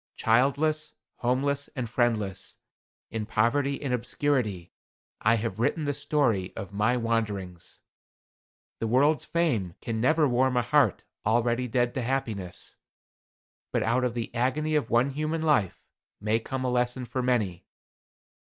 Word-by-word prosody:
Childless, 140 Hz, +7 st, +2 dB, 0.2 s
homeless 140 Hz, +3 st, 0 dB
and 130 Hz, -3 st, -2 dB
friendless, 110 Hz, -5 st, -1 dB, 0.5 s
in 110 Hz, -2 st, -3 dB
poverty 135 Hz, +6 st, +1 dB
and 135 Hz, -4 st, -2 dB
obscurity, 120 Hz, -, -1 dB, 0.5 s
I 115 Hz, +2 st, +4 dB
have 110 Hz, -2 st, -3 dB
written 145 Hz, +6 st, +1 dB
the 145 Hz, -1 st, 0 dB
story 115 Hz, -11 st, 0 dB
of 100 Hz, 0 st, -7 dB
my 110 Hz, +5 st, +2 dB
wanderings. 105 Hz, -7 st, -3 dB, 1.0 s
The 115 Hz, -, -1 dB
world's 145 Hz, +6 st, +3 dB
fame 120 Hz, -, 0 dB
can 115 Hz, -2 st, -3 dB
never 155 Hz, +4 st, +4 dB
warm 125 Hz, 0 st, +2 dB
a 120 Hz, -, +3 dB
heart -, -, +3 dB, 0.2 s
already 120 Hz, +3 st, +1 dB
dead 120 Hz, +1 st, +1 dB
to 130 Hz, -, -2 dB
happiness; 110 Hz, -8 st, -3 dB, 0.9 s
but -, -, +1 dB
out 120 Hz, +3 st, +1 dB
of 125 Hz, -2 st, -1 dB
the 120 Hz, -1 st, -4 dB
agony 130 Hz, +6 st, 0 dB
of 150 Hz, -7 st, +1 dB
one 120 Hz, +4 st, +3 dB
human 155 Hz, +3 st, -2 dB
life, 110 Hz, -, +1 dB, 0.4 s
may 110 Hz, +2 st, +1 dB
come 130 Hz, +3 st, -4 dB
a 125 Hz, -, +1 dB
lesson 125 Hz, +1 st, 0 dB
for 130 Hz, +2 st, -3 dB
many. 110 Hz, -9 st, 0 dB
120 Hz, 140 wpm, -27 LUFS, 110-135 Hz, 1.0 s, I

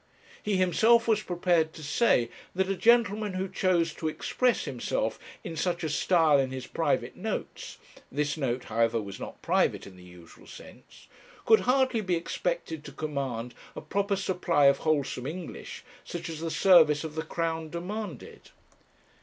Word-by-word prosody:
He 205 Hz, -2 st, 0 dB
himself 225 Hz, +6 st, +4 dB
was 215 Hz, -2 st, +3 dB
prepared 175 Hz, -4 st, +1 dB
to 155 Hz, -, -10 dB
say 140 Hz, -, +2 dB, 0.3 s
that 190 Hz, +1 st, +1 dB
a -, -, 0 dB
gentleman 215 Hz, 0 st, +3 dB
who 185 Hz, +1 st, -2 dB
chose 180 Hz, -3 st, +1 dB
to 160 Hz, -, -4 dB
express 245 Hz, +10 st, 0 dB
himself -, -, -2 dB, 0.2 s
in 165 Hz, -, -6 dB
such 175 Hz, +2 st, -1 dB
a 160 Hz, -, -1 dB
style 155 Hz, -1 st, +3 dB
in 135 Hz, -1 st, +1 dB
his 130 Hz, -1 st, -6 dB
private -, -, -1 dB
notes -, -, -5 dB, 0.3 s
this 145 Hz, +1 st, -1 dB
note, 130 Hz, -5 st, -2 dB
however, 115 Hz, 0 st, +1 dB
was 100 Hz, -3 st, -7 dB
not -, -, -9 dB
private -, -, +1 dB
in 95 Hz, -2 st, -13 dB
the 90 Hz, -, -14 dB
usual 90 Hz, -2 st, -15 dB
sense -, -, -14 dB, 0.4 s
could 220 Hz, -, +6 dB
hardly 260 Hz, -3 st, +3 dB
be 185 Hz, -3 st, 0 dB
expected 165 Hz, -, -3 dB
to -, -, -8 dB
command 135 Hz, -6 st, -4 dB, 0.2 s
a -, -, -6 dB
proper 200 Hz, +1 st, -1 dB
supply 180 Hz, -6 st, +1 dB
of 140 Hz, 0 st, +5 dB
wholesome 140 Hz, -5 st, -1 dB
English, 170 Hz, +3 st, -7 dB, 0.2 s
such 170 Hz, -1 st, -6 dB
as 160 Hz, -2 st, -6 dB
the 165 Hz, 0 st, -3 dB
service 160 Hz, -4 st, +5 dB
of 160 Hz, -1 st, -6 dB
the 160 Hz, -, -2 dB
Crown 165 Hz, 0 st, -3 dB
demanded!' 180 Hz, -, -7 dB
165 Hz, 160 wpm, -28 LUFS, 145-195 Hz, 0.4 s, could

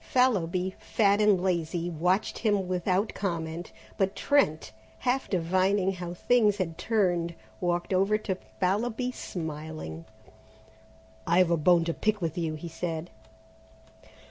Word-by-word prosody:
Fallowby, 190 Hz, -8 st, +1 dB
fat 205 Hz, -1 st, +2 dB
and 210 Hz, -3 st, +5 dB
lazy, 175 Hz, -2 st, -1 dB
watched 180 Hz, +5 st, 0 dB
him 205 Hz, -4 st, +1 dB
without 185 Hz, +3 st, 0 dB
comment, 170 Hz, -3 st, -3 dB, 0.3 s
but 195 Hz, 0 st, +1 dB
Trent, 215 Hz, -, +1 dB, 0.3 s
half 255 Hz, +1 st, -1 dB
divining 185 Hz, +2 st, +2 dB
how 175 Hz, -2 st, -6 dB
things 215 Hz, 0 st, +3 dB
had 170 Hz, -4 st, -2 dB
turned, 175 Hz, -6 st, +1 dB, 0.2 s
walked 175 Hz, +1 st, -1 dB
over 195 Hz, +3 st, +3 dB
to 215 Hz, -2 st, -2 dB, 0.3 s
Fallowby 225 Hz, +6 st, 0 dB
smiling. 155 Hz, -, -6 dB, 1.2 s
"I've 175 Hz, +1 st, +4 dB
a -, -, +5 dB
bone 170 Hz, +2 st, +4 dB
to 165 Hz, -, -1 dB
pick 215 Hz, +3 st, 0 dB
with 165 Hz, -4 st, -2 dB
you!" 165 Hz, -3 st, -2 dB
he 155 Hz, +2 st, -7 dB
said. 165 Hz, 0 st, -4 dB
180 Hz, 125 wpm, -28 LUFS, 170-205 Hz, 1.2 s, and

